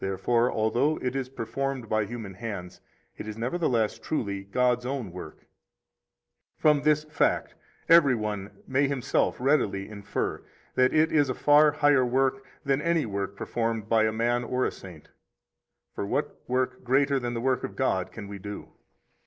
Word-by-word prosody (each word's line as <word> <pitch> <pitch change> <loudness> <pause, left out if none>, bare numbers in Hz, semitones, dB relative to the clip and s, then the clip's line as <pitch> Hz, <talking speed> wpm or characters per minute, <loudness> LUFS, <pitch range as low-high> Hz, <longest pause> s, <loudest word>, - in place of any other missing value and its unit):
Therefore, 115 +6 +1
although 120 +8 +1
it 125 +1 -3
is 130 -2 -2
performed 135 0 -3
by 110 0 +1
human 110 -3 -7
hands, 95 -3 -7 0.4
it - - -6
is 110 0 -6
nevertheless 120 -3 0
truly 100 -9 -3
God's 125 +3 +1
own 125 -6 -4
work. 85 -3 -10 1.1
From 150 -2 +4
this 150 +1 +3
fact 155 +1 0 0.3
every 165 -6 +6
one 105 -3 -5
may 135 +2 +2
himself 135 -2 0
readily 125 -8 +1
infer 100 -2 -4 0.3
that 130 0 +3
it 155 +1 +3
is 145 -3 +3
a 130 - -1
far 150 +1 +5
higher 145 -2 +3
work 135 +2 +1 0.2
than 135 +1 +1
any 170 -1 +1
work 100 -2 -3
performed 115 -1 -2
by 110 -1 +4
a 110 - +1
man 120 +2 0
or 125 +2 0
a - - 0
saint. 85 -5 -12 0.8
For - - -4
what - - -2
work 130 0 -1
greater 135 +2 +2
than 120 -1 -3
the - - -2
work 130 +1 0
of - - -5
God 95 -8 0
can 110 -3 -8
we 100 0 -8
do? 100 +1 -8
125 Hz, 165 wpm, -27 LUFS, 105-135 Hz, 1.1 s, every